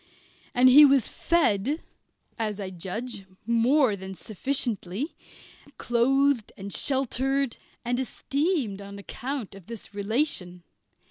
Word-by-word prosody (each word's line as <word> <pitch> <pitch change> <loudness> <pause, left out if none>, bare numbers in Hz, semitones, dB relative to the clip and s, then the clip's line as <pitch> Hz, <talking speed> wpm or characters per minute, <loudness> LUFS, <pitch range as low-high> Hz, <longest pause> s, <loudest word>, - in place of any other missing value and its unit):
And 250 +1 +6
he 275 +4 +9
was 275 -4 +5
fed 290 - +1 0.6
(as 215 -2 -2
I 190 -2 -4
judge) 195 +4 -5 0.2
more 235 +1 +3
than 190 0 -8
sufficiently, 220 - -1 0.6
clothed, 260 0 +2 0.2
sheltered, 270 0 0 0.3
and 245 +1 0
esteemed 270 - -1
on 200 0 -9
account 255 +2 -5
of 195 -3 -13
this 230 -3 -9
relation. 200 - -1
240 Hz, 105 wpm, -26 LUFS, 200-275 Hz, 0.6 s, he